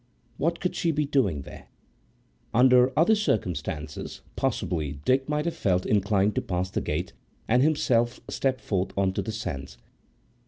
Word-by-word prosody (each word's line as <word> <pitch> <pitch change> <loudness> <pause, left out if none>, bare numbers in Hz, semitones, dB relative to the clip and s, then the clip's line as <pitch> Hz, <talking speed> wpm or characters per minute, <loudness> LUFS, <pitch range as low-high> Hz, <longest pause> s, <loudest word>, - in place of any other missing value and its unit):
What 170 +3 0
could 180 - -2
she 170 - 0
be 150 -1 +1
doing 105 - +1
there? - - -12 0.9
Under 125 +1 +6
other 170 +8 +5
circumstances, 85 - -2
possibly 75 -5 -1
Dick 135 +2 +2
might 150 0 0
have 170 - 0
felt 90 -2 +1
inclined 100 0 +2
to - - 0
pass 90 0 -2
the - - -1
gate 85 +4 -3 0.3
and 125 +3 +4
himself 125 -5 +2
step 130 -1 -1
forth 95 -2 -2
on 95 -1 +2
to - - -1
the 110 - -4
sands. 70 - -5
110 Hz, 155 wpm, -26 LUFS, 90-135 Hz, 0.9 s, Under